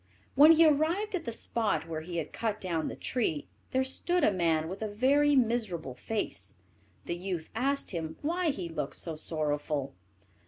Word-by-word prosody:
When 300 +4 +8
he 325 +1 +6
arrived 320 +8 +2
at 360 -3 -2
the 235 - -2
spot 225 -5 0
where 160 -1 -4
he 170 +2 -5
had 165 - -4
cut 220 -2 -2
down 170 -5 -2
the - - -4
tree, 185 - -1 0.2
there 260 0 +1
stood 345 +7 0
a - - +5
man 165 -4 +1
with 190 +5 -6
a 220 - -1
very 280 +7 +3
miserable 220 - 0
face. 215 - -4 0.5
The 170 - -2
youth 175 -2 -4
asked 275 +5 0
him 160 -3 -4
why 340 +3 +1
he 190 - -3
looked 150 -4 -4
so 165 -2 -4
sorrowful. 150 -3 -2
205 Hz, 180 wpm, -30 LUFS, -, 0.5 s, When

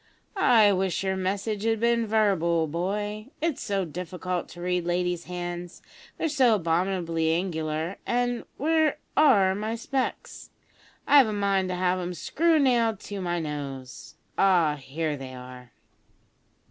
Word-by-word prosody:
"I 225 - +5
wish 190 0 -1
your 190 0 0
message 200 +3 -2
had 225 0 +1
been 235 0 +2
verbal, 185 -7 +2
boy. 205 +7 -3
It's 320 -3 -1
so 195 -3 -1
difficult 180 +2 -4
to 175 - -11
read 180 0 0
ladies' 175 0 -1
hands; 175 -1 -6 0.3
they're - - 0
so 265 -7 +4
abominably 170 -2 0
angular, 160 0 -2
and 245 0 -1
where 315 0 +2 0.2
are 205 -11 +5
my 215 +3 -3
specs? 260 +3 -4 0.6
I've 280 -4 +6
a 215 - -2
mind 195 -2 +1
to 180 - -2
have 180 0 +1
'em 180 0 -4
screw 320 - +2
nailed 235 -7 +2
to 200 -1 -6
my 175 -1 -1
nose. 140 -5 -6 0.2
Ah! 175 -6 +4
here 150 +2 -3
they 130 -2 -8
are." 125 -1 -11
185 Hz, 140 wpm, -26 LUFS, 170-220 Hz, 0.6 s, I've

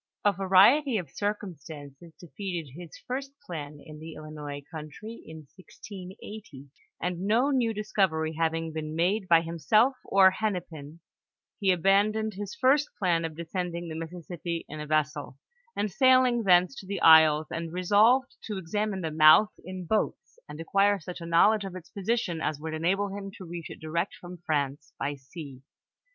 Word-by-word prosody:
A 205 - +6
variety 200 +8 +4
of 170 -8 -5
circumstances 165 -6 -6
defeated 170 -2 -6
his 175 -1 -10
first 270 +2 -4
plan 150 -4 -7
in 155 -1 -11
the 160 0 -9
Illinois 150 -2 -8
country, 165 +9 -9
in 160 0 -9
1680, 185 - -11 0.3
and 180 +2 -3
no 240 +7 +3
new 245 -4 +1
discovery 190 -7 0
having 165 0 -1
been 155 0 -5
made 185 +4 0
by 165 -1 +6
himself 170 - +2
or 190 -1 +5
Hennepin, 170 -7 -5 0.6
he 195 -2 +3
abandoned 205 +4 +2
his 205 +1 -6
first 280 +3 +3
plan 175 -4 +1
of 160 -1 -6
de 170 +1 -6
scending 175 -1 -4
the - - -5
Mississippi 170 +1 -6
in 155 - -8
a 150 - -6
vessel, 150 -3 -1 0.4
and 210 -1 -1
sailing 255 0 +4
thence 180 +3 +5
to 190 - -12
the 200 0 -3
isles, 160 -1 +7
and 165 0 -4
resolved 210 +8 +3
to 210 -3 -4
examine 195 +2 -2
the 160 -2 -3
mouth 155 +7 +6
in 185 0 -7
boats, 175 -4 -2
and 150 +1 -9
acquire 200 +4 +2
such 175 +2 -8
a 170 - -6
knowledge 200 +6 +4
of 190 -2 -7
its 180 -2 -11
position 200 -4 -2
as 150 -2 -2
would 160 +1 -5
enable 190 +6 0
him 200 -1 -6
to 185 - -9
reach 170 -1 -7
it - - -10
direct 170 +4 -2
from 175 0 -10
France 145 -1 -2
by 145 - -2
sea. 140 -1 -11
175 Hz, 165 wpm, -27 LUFS, 160-205 Hz, 0.6 s, isles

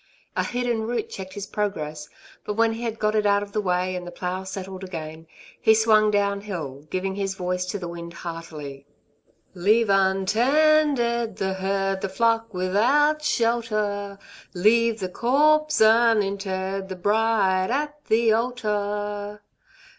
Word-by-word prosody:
A - - +1
hidden 245 -2 -1
root 230 0 -3
checked 190 -1 -7
his 200 -1 -5
progress; 155 -8 -4 0.3
but 210 - -4
when 225 0 +2
he 225 - -7
had 230 -2 -3
got 215 0 0
it 210 -1 +2
out 200 0 +3
of 205 - -10
the 210 - -1
way, 185 -1 0
and 180 -1 -6
the - - -7
plough 180 +1 -4
settled 190 0 -7
again, 160 -3 -7 0.3
he 220 - +5
swung 215 -1 +4
down 200 -1 +1
hill, 155 -8 -6
giving 190 +1 -2
his 195 -1 -3
voice 180 0 -2
to 205 - -3
the 180 -3 -6
wind 170 0 -8
heartily: 150 -5 -7 0.7
Leave 205 +4 +2
untended 235 +5 +2
the 190 0 -2
herd, 195 0 -1
The 195 - -2
flock 230 +2 +1
without 245 +12 +2
shelter; 215 -5 -1 0.4
Leave 225 +4 +3
the 185 - -1
corpse 305 +8 +2
uninterred, 195 -4 +2
The 190 - -5
bride 205 -1 +1
at 295 +3 -2
the 225 0 +3
altar. 210 -3 -2
205 Hz, 145 wpm, -24 LUFS, 190-230 Hz, 0.7 s, he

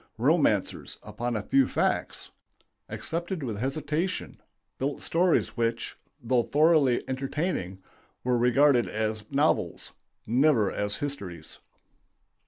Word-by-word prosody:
Romancers, - - +1
upon 120 0 -3
a 105 - -2
few 135 +4 +3
facts, - - -1 0.6
accepted 170 0 -4
with 115 -5 -3
hesitation, 150 - -2 0.4
built 140 +2 -2
stories 175 +1 +1
which, 115 0 -1 0.2
though 125 -1 +2
thoroughly 150 -2 +3
entertaining, 130 - -2 0.5
were 125 0 +1
regarded 125 +1 +4
as 110 0 -2
novels, 145 +3 0 0.3
never 120 -3 +3
as 105 0 -2
histories. 100 - -5
130 Hz, 100 wpm, -27 LUFS, 115-150 Hz, 0.6 s, regarded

